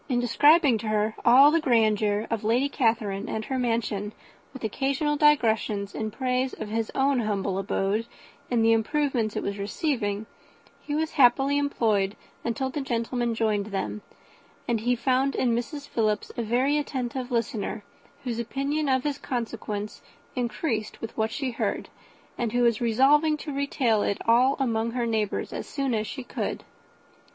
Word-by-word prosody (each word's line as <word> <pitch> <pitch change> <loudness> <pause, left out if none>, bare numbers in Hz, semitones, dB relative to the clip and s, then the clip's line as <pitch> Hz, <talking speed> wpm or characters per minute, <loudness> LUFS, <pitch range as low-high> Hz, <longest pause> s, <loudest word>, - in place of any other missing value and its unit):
In 245 -2 +2
describing 275 +1 +4
to 220 - -5
her 215 0 +1
all 270 +5 +7
the 330 - +3
grandeur 215 -5 +2
of 225 -2 -1
Lady 240 +6 +2
Catherine 225 -6 0
and 220 0 -3
her 265 -1 -2
mansion, 220 -4 -1 0.4
with 265 -2 -10
occasional 275 +6 0
digressions 225 -9 +2
in 220 -1 -3
praise 255 +2 -1
of 210 - -6
his 225 0 -2
own 270 -1 +2
humble 200 -3 -1
abode, 195 +3 -1 0.4
and 230 -2 +2
the 225 - +5
improvements 240 -2 0
it - - -2
was 200 0 -3
receiving, 205 -1 -2 0.6
he 290 - -4
was 315 +1 -1
happily 270 +2 +4
employed 215 -8 +1 0.3
until 265 +3 -2
the 290 - -3
gentlemen 240 -2 -1
joined 215 -3 0
them; 205 +1 -3 0.7
and 235 -2 +1
he 245 +3 +1
found 260 +3 +1
in 245 -2 +1
Mrs. 285 +5 -4
Philips 215 -4 -1
a - - -2
very 255 +6 +1
attentive 260 -3 -3
listener, 225 -3 -2 0.4
whose 240 -3 -3
opinion 275 +5 -1
of 260 -1 +2
his 290 -1 -2
consequence 220 -4 -4 0.3
increased 240 -3 -2
with 225 - -7
what 220 0 0
she 260 +3 -3
heard, 230 - -2 0.5
and 235 -2 -1
who 245 0 +2
was 235 -2 +2
resolving 285 +7 +4
to 295 -1 -6
retail 270 -6 +1
it 200 - 0
all 250 +4 +5
among 230 -3 0
her 245 -1 -1
neighbours 220 -3 -1
as - - -5
soon 275 -3 -2
as 215 -1 -1
she 265 - -6
could. - - -4
235 Hz, 160 wpm, -26 LUFS, 215-270 Hz, 0.7 s, all